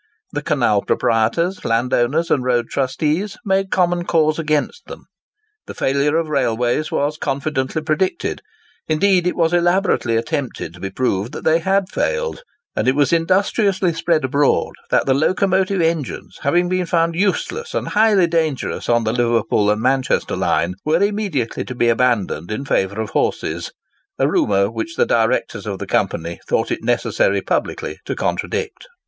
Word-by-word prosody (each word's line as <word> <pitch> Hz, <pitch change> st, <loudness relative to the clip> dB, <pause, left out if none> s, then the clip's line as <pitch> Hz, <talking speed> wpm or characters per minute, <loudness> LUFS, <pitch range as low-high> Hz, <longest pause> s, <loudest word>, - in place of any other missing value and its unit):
The -, -, -3 dB
canal -, -, +1 dB
proprietors, 140 Hz, -, 0 dB
landowners, 125 Hz, +7 st, +1 dB
and 130 Hz, -, +2 dB
road 120 Hz, -2 st, 0 dB
trustees, 155 Hz, +10 st, -1 dB
made 195 Hz, -1 st, +1 dB
common 175 Hz, -2 st, +1 dB
cause 155 Hz, -2 st, +1 dB
against 150 Hz, -2 st, -1 dB
them. -, -, -10 dB, 0.6 s
The -, -, -8 dB
failure 140 Hz, +3 st, +1 dB
of 165 Hz, -1 st, 0 dB
railways 125 Hz, +2 st, 0 dB
was 150 Hz, -1 st, -1 dB
confidently 140 Hz, +1 st, -2 dB
predicted—indeed, 180 Hz, -, -1 dB
it -, -, 0 dB
was 165 Hz, -1 st, +1 dB
elaborately 175 Hz, -, +2 dB
attempted 130 Hz, -, -3 dB
to 90 Hz, -, -14 dB
be 95 Hz, -, -4 dB
proved 115 Hz, 0 st, -1 dB
that -, -, -7 dB
they 160 Hz, +1 st, +3 dB
had 190 Hz, +2 st, +1 dB
failed; 485 Hz, -, -2 dB, 0.3 s
and -, -, -1 dB
it 130 Hz, -, +3 dB
was 145 Hz, +3 st, +2 dB
industriously 190 Hz, +2 st, +2 dB
spread 165 Hz, -2 st, +1 dB
abroad 140 Hz, +2 st, +1 dB, 0.2 s
that -, -, +2 dB
the 135 Hz, -, +3 dB
locomotive 185 Hz, +5 st, +1 dB
engines, 160 Hz, -5 st, -2 dB
having 175 Hz, +5 st, +2 dB
been 185 Hz, -1 st, -1 dB
found 165 Hz, -1 st, +1 dB
useless 205 Hz, -, -1 dB
and -, -, -2 dB
highly 210 Hz, -3 st, +4 dB
dangerous 160 Hz, -4 st, -1 dB
on 120 Hz, -1 st, +3 dB
the 110 Hz, 0 st, 0 dB
Liverpool 115 Hz, -3 st, +1 dB
and 105 Hz, +1 st, 0 dB
Manchester 130 Hz, 0 st, +1 dB
line, 85 Hz, +2 st, 0 dB
were 160 Hz, +5 st, +2 dB
immediately 200 Hz, -, -1 dB
to 130 Hz, -, -7 dB
be 120 Hz, -1 st, +2 dB
abandoned 115 Hz, -9 st, +1 dB
in 110 Hz, +6 st, -4 dB
favour 100 Hz, -4 st, 0 dB
of 110 Hz, -, -5 dB
horses—a -, -, -3 dB
rumour 100 Hz, -1 st, +2 dB
which 330 Hz, -, -5 dB
the 480 Hz, -, +3 dB
directors -, -, 0 dB
of -, -, -3 dB
the -, -, -5 dB
Company -, -, -1 dB
thought 485 Hz, -, 0 dB
it -, -, -3 dB
necessary -, -, +1 dB
publicly -, -, -2 dB
to -, -, -3 dB
contradict. 445 Hz, +2 st, -3 dB
155 Hz, 155 wpm, -19 LUFS, 125-185 Hz, 0.6 s, highly